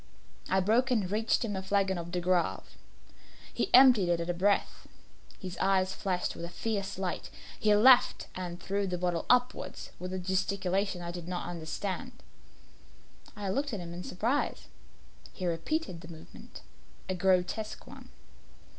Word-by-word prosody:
I 190 Hz, 0 st, +3 dB
broke 230 Hz, +7 st, +3 dB
and 210 Hz, -7 st, +1 dB
reached 220 Hz, +3 st, +1 dB
him 205 Hz, -3 st, -3 dB
a 190 Hz, -, -2 dB
flagon 190 Hz, -1 st, +1 dB
of 170 Hz, 0 st, -7 dB
De 180 Hz, -, -1 dB
Grave. 175 Hz, 0 st, 0 dB, 0.8 s
He -, -, -1 dB
emptied 250 Hz, -8 st, +7 dB
it 170 Hz, -1 st, +2 dB
at 170 Hz, +1 st, -1 dB
a -, -, -2 dB
breath. 200 Hz, +4 st, 0 dB, 0.5 s
His 185 Hz, -2 st, -7 dB
eyes 190 Hz, -1 st, +2 dB
flashed 185 Hz, -2 st, -2 dB
with -, -, -8 dB
a 170 Hz, -, -4 dB
fierce 195 Hz, 0 st, -3 dB
light. 190 Hz, -2 st, -3 dB, 0.3 s
He 210 Hz, -1 st, +4 dB
laughed 245 Hz, +4 st, +6 dB
and 175 Hz, -1 st, -5 dB
threw 200 Hz, 0 st, -1 dB
the 180 Hz, -1 st, -2 dB
bottle 175 Hz, -2 st, -1 dB
upwards 250 Hz, 0 st, +1 dB
with 180 Hz, 0 st, -5 dB
a 185 Hz, -, -2 dB
gesticulation 190 Hz, 0 st, -1 dB
I 170 Hz, -, -4 dB
did 175 Hz, -1 st, -7 dB
not 180 Hz, -1 st, -3 dB
understand. 175 Hz, +3 st, -4 dB, 1.2 s
I 205 Hz, -2 st, -4 dB
looked 275 Hz, +7 st, -1 dB
at 210 Hz, -, -2 dB
him 170 Hz, -1 st, -7 dB
in 175 Hz, +1 st, -6 dB
surprise. 230 Hz, +12 st, -1 dB, 0.7 s
He 185 Hz, -, -5 dB
repeated 175 Hz, -, -2 dB
the 165 Hz, -, -11 dB
movement 160 Hz, -2 st, -12 dB, 0.5 s
a 185 Hz, -, -1 dB
grotesque 185 Hz, +4 st, 0 dB
one. -, -, -12 dB
190 Hz, 160 wpm, -30 LUFS, 175-205 Hz, 1.2 s, emptied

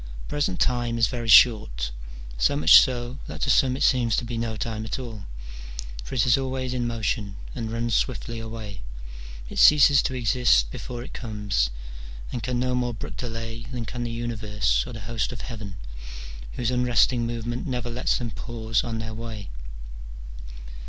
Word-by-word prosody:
Present 145 Hz, -11 st, -1 dB
time 120 Hz, -1 st, +1 dB
is 115 Hz, -, +4 dB
very 120 Hz, +1 st, -4 dB
short, 80 Hz, -, +5 dB, 0.4 s
so -, -, +2 dB
much 80 Hz, +2 st, +9 dB
so 125 Hz, +1 st, -1 dB
that -, -, -7 dB
to -, -, +2 dB
some 130 Hz, -1 st, +3 dB
it -, -, 0 dB
seems 120 Hz, -4 st, +3 dB
to -, -, -1 dB
be 120 Hz, 0 st, -4 dB
no 115 Hz, -1 st, -2 dB
time 110 Hz, -1 st, -3 dB
at 110 Hz, -, -3 dB
all; 115 Hz, -7 st, -7 dB, 0.8 s
for -, -, -6 dB
it 115 Hz, -, +3 dB
is 125 Hz, +1 st, +4 dB
always 130 Hz, -1 st, -2 dB
in 120 Hz, -1 st, -1 dB
motion, 110 Hz, -3 st, -2 dB, 0.2 s
and 115 Hz, -3 st, -4 dB
runs 115 Hz, 0 st, -1 dB
swiftly 115 Hz, -2 st, -1 dB
away: 110 Hz, -3 st, -7 dB, 0.7 s
it -, -, -4 dB
ceases 145 Hz, -3 st, +7 dB
to 130 Hz, -, -2 dB
exist 115 Hz, -, +3 dB
before 120 Hz, -1 st, -6 dB
it -, -, -10 dB
comes, 105 Hz, -, -1 dB, 0.6 s
and 120 Hz, -, -3 dB
can 125 Hz, 0 st, -2 dB
no 125 Hz, 0 st, 0 dB
more 125 Hz, -2 st, 0 dB
brook -, -, -7 dB
delay 115 Hz, 0 st, -5 dB
than 120 Hz, -3 st, -4 dB
can 120 Hz, +2 st, -4 dB
the 120 Hz, -, -3 dB
universe 105 Hz, -, -1 dB
or -, -, -7 dB
the 110 Hz, -, -7 dB
host 110 Hz, +2 st, -2 dB
of 125 Hz, -, -7 dB
heaven, 105 Hz, -5 st, -7 dB, 0.8 s
whose 120 Hz, 0 st, -1 dB
unresting 125 Hz, -1 st, +2 dB
movement 120 Hz, +1 st, -4 dB
never 125 Hz, -2 st, -3 dB
lets 125 Hz, +2 st, 0 dB
them 120 Hz, -2 st, -4 dB
pause 115 Hz, -1 st, -2 dB
on 115 Hz, -1 st, -3 dB
their 110 Hz, 0 st, -5 dB
way. 110 Hz, -, -7 dB
115 Hz, 175 wpm, -25 LUFS, 110-125 Hz, 0.8 s, much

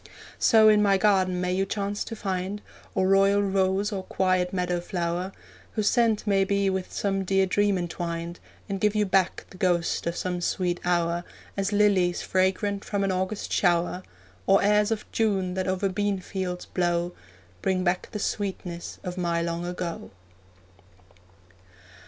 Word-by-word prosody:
So 220 Hz, -1 st, +6 dB
in 210 Hz, -1 st, +6 dB
my 200 Hz, -1 st, +4 dB
garden 190 Hz, -3 st, +2 dB
may 180 Hz, 0 st, 0 dB
you 190 Hz, +1 st, +1 dB
chance 200 Hz, +1 st, -2 dB
to 225 Hz, -, -6 dB
find 195 Hz, 0 st, -3 dB, 0.3 s
Or 185 Hz, -, +2 dB
royal 195 Hz, +1 st, +4 dB
rose 195 Hz, +1 st, +1 dB
or 195 Hz, -2 st, -2 dB
quiet 185 Hz, -1 st, 0 dB
meadow 180 Hz, -1 st, -1 dB
flower, 175 Hz, +1 st, -2 dB, 0.4 s
Whose 215 Hz, -2 st, +1 dB
scent 230 Hz, -4 st, +2 dB
may 195 Hz, -2 st, +3 dB
be 200 Hz, 0 st, +1 dB
with 190 Hz, -1 st, -3 dB
some 195 Hz, -1 st, -1 dB
dear 195 Hz, +1 st, +2 dB
dream 205 Hz, +1 st, +2 dB
entwined, 170 Hz, -1 st, -4 dB, 0.3 s
And 195 Hz, -2 st, -4 dB
give 210 Hz, 0 st, +2 dB
you 210 Hz, 0 st, +3 dB
back 190 Hz, -1 st, +1 dB
the 185 Hz, -, -12 dB
ghost 175 Hz, -2 st, +1 dB
of 170 Hz, -, -2 dB
some 180 Hz, -1 st, -2 dB
sweet 175 Hz, 0 st, -1 dB
hour, 175 Hz, -1 st, +1 dB, 0.3 s
As 195 Hz, +1 st, -1 dB
lilies 200 Hz, -4 st, +3 dB
fragrant 190 Hz, +2 st, 0 dB
from 200 Hz, -1 st, -1 dB
an 195 Hz, -, +1 dB
August 185 Hz, +3 st, -2 dB
shower, 175 Hz, 0 st, +2 dB, 0.5 s
Or 195 Hz, -, +5 dB
airs 210 Hz, 0 st, +3 dB
of 225 Hz, -2 st, -2 dB
June 195 Hz, -5 st, 0 dB
that 185 Hz, 0 st, -2 dB
over 185 Hz, +1 st, 0 dB
bean 200 Hz, +1 st, 0 dB
fields 185 Hz, -1 st, -4 dB
blow, 175 Hz, -1 st, 0 dB, 0.5 s
Bring 185 Hz, -1 st, +1 dB
back 180 Hz, 0 st, 0 dB
the 215 Hz, -, -5 dB
sweetness 190 Hz, -4 st, -4 dB
of 180 Hz, 0 st, -5 dB
my 170 Hz, -1 st, 0 dB
long 170 Hz, +1 st, -3 dB
ago. 175 Hz, -2 st, -5 dB
190 Hz, 160 wpm, -26 LUFS, 180-200 Hz, 0.5 s, So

